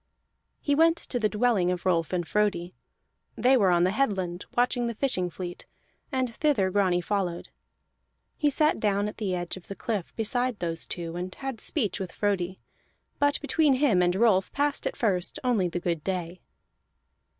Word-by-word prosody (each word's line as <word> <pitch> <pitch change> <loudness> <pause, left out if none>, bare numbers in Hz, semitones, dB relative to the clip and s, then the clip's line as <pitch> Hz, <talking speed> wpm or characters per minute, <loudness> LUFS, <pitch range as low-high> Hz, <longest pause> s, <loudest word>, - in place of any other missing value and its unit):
He 285 - 0
went 330 +3 +4
to 245 - -4
the 215 -2 +2
dwelling 210 -5 +2
of 180 -1 -2
Rolf 170 -3 +1
and 175 -3 -1
Frodi; 200 -4 0 0.6
they 260 +2 +4
were 200 -7 +4
on 175 -1 +4
the 185 - +3
headland 190 -7 -1
watching 245 0 +2
the 235 - -3
fishing 205 -8 0
fleet, 175 0 -7 0.4
and 260 -3 -1
thither 245 -10 +1
Grani 185 -3 +2
followed. 180 -3 -2 0.9
He 295 - +2
sat 300 -1 +2
down 205 -1 +1
at 210 - -7
the 195 -4 -1
edge 175 +1 -4
of 185 - -13
the 195 - -6
cliff 210 -6 -4
beside 245 +1 0
those 165 -3 -3
two, 170 -1 -4
and 180 +1 -5
had 270 -4 -5
speech 225 - 0
with 185 -3 -5
Frodi; 190 -3 -1 0.6
but 285 0 +3
between 295 -1 +3
him 255 -9 +3
and 180 0 +2
Rolf 195 -3 +3
passed 285 0 0
at - - -2
the - - -18
first 190 -6 0
only 230 -8 +2
the 175 0 -3
good 170 -3 -2
day. 180 -2 -3
200 Hz, 180 wpm, -27 LUFS, 180-245 Hz, 0.9 s, went